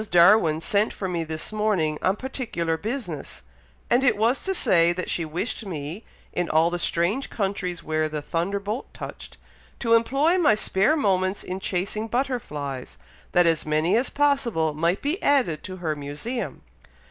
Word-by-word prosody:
Darwin 170 -2 +5
sent 205 +5 +1
for 190 - -4
me 175 -2 -1
this 160 +5 -4
morning 195 -8 +1
on 190 - +2
particular 230 -10 -2
business; 200 - -5 0.4
and 250 +2 +3
it 255 - +3
was 230 +5 +2
to 385 0 -1
say 170 - +4
that 180 +1 -3
she 170 - 0
wished 170 +10 -3
me, 165 +1 -5 0.3
in 175 -1 -1
all 160 +2 +3
the 175 - -2
strange 175 +12 0
countries 190 -4 -2
where 155 0 0
the 155 0 -3
Thunderbolt 200 - -3
touched, - - -8 0.4
to 230 -2 +2
employ 275 +10 +3
my 290 -11 +5
spare 210 +7 +2
moments 190 -6 +1
in 185 +1 -4
chasing 200 +4 -2
butterflies, 150 - -3 0.4
that 175 0 +5
as 165 -2 +2
many 155 +5 +1
as 245 +4 +2
possible 250 - +1
might 170 +5 0
be 300 +7 -1
added 250 - +2
to 185 - -6
her 160 -4 -2
museum." 150 - -5
185 Hz, 160 wpm, -25 LUFS, 165-230 Hz, 0.4 s, Darwin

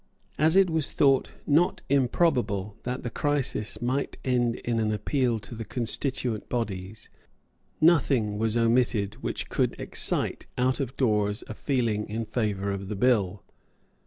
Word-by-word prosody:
As 160 +3 +4
it 195 -1 +6
was 160 -3 0
thought 135 -3 +3 0.2
not 160 +5 +2
improbable 120 - +1
that 125 +1 -3
the 120 - -4
crisis 145 -7 -1
might 130 +3 -1
end 120 -2 +1
in 120 -1 -2
an 110 -1 +1
appeal 120 +2 0
to 100 - -8
the 115 0 -5
constituent 120 0 -1
bodies, 110 -3 -4 0.7
nothing 135 -10 +3
was 110 +1 +1
omitted 115 -3 +1
which - - -3
could - - -1
excite - - 0
out 130 +2 +1
of 135 -2 -4
doors 105 -3 +1
a 115 - -5
feeling 115 -5 -1
in 110 +2 -3
favour 105 -3 -1
of 100 -1 -4
the 105 - -4
bill. 105 -4 +1
120 Hz, 145 wpm, -27 LUFS, 105-130 Hz, 0.7 s, it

